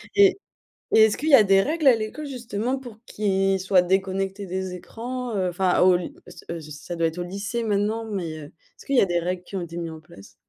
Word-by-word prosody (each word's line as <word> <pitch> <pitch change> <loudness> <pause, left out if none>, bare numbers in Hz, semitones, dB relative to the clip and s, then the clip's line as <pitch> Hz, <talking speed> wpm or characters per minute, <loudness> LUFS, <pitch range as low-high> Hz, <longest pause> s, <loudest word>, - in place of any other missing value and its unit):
Et 395 -1 +6 0.6
et 220 - +8
est-ce 215 - 0
qu'il 310 - -2
y 290 - +3
a 235 - +9
des 195 -1 +4
règles 310 +1 0
à 250 - +8
l'école, 225 +8 -5
justement? 245 -1 -3
Pour 240 -5 -11
qu'ils 195 -2 +1
soient 185 -1 +4
déconnectés 195 +2 -1
des 185 0 -4
écrans? 235 +6 -6
Heu, 185 -2 0
enfin 180 +1 +1
au 180 0 +6
ly 175 - -6
ce, - - -13
heu, 165 - -6
ça 150 +3 -8
doit 165 0 +1
être 160 - -6
au 175 - -2
lycée 200 +6 -4
maintenant. 215 +1 0
Mais, 180 -7 -4
heu, 155 - -8
est-ce 165 - -19
qu'il 275 -2 +1
y - - +7
a - - +5
des 175 - 0
règles 180 +1 -3
qui 195 - -10
ont 185 - -2
été 170 0 -7
mis 170 -1 -4
en 160 -1 -9
place? 100 -11 -16
195 Hz, 245 wpm, -24 LUFS, 180-225 Hz, 0.6 s, a